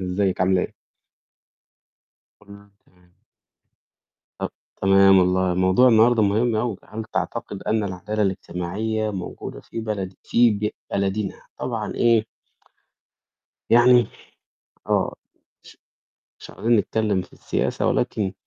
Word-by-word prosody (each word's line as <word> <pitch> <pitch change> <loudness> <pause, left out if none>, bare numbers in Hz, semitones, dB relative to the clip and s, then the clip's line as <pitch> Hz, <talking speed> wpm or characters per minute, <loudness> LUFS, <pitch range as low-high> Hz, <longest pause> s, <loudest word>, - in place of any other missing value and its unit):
إزيّك، 95 0 -1
عاملة 95 0 +3
إيه؟ - - -5 1.7
كلّه 100 0 -15 0.2
تمام. 90 -1 -28 1.2
طَب - - -3 0.3
تمام 95 0 +6
والله، 90 0 +2
موضوع 95 +7 +4
النهارده 115 0 +5
مهم 110 +3 +2
أوي. 110 -2 -1
هل 110 +1 -7
تعتقد - - -4
أن 110 -1 0
العدالة 100 +3 -3
الاجتماعية 100 +3 -2
موجودة 95 -3 -7
في 115 - -7
بلد 100 -4 -4
في 120 0 +4
ب 105 0 -1 0.2
بلدنا؟ 100 0 -2 0.2
طبعًا - - -4
إيه 115 -2 +3 1.4
يعني 120 0 +6 0.8
آه، - - +1 0.5
ش - - -16 0.6
مش - - -12
عايزين 115 +2 +1
نتكلّم 105 -2 0
في 90 - -15
السياسة - - -2
ولكن 100 -3 -1
100 Hz, 110 wpm, -23 LUFS, 95-110 Hz, 1.7 s, تمام